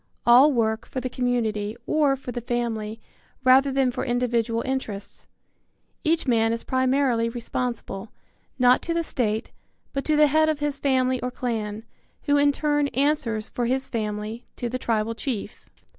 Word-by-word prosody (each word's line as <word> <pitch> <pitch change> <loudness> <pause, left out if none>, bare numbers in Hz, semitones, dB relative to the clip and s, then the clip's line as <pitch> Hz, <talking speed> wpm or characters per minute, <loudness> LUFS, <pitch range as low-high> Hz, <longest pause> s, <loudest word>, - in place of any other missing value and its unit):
All 255 +5 +7
work 220 -3 0
for 260 - -4
the 255 0 -4
community, 225 -4 -1
or 295 -3 +2
for 260 -2 -7
the 240 - -4
family, 225 -2 -3 0.4
rather 265 +2 +5
than 265 -1 +2
for 255 - -3
individual 235 -2 0
interests. 225 -7 -5 0.8
Each 330 +1 +1
man 225 -2 +3
is 230 0 -3
primarily 260 -3 +1
responsible, 235 -3 -4 0.5
not 250 -1 +5
to 335 - -2
the 335 - +1
state, 220 -8 -2 0.4
but 275 -1 -2
to 310 - +2
the 300 0 +6
head 310 +2 +3
of 310 - 0
his 290 -1 -2
family 260 -2 +1
or 250 - -2
clan, 220 -4 -3 0.4
who 285 - +2
in 285 0 +4
turn 295 0 +1
answers 255 -6 0
for 240 -1 -2
his 265 +2 0
family 215 +1 -4
to 240 - -3
the 255 +2 -3
tribal 225 -1 0
chief. 230 -3 -5
245 Hz, 160 wpm, -25 LUFS, 225-275 Hz, 0.8 s, All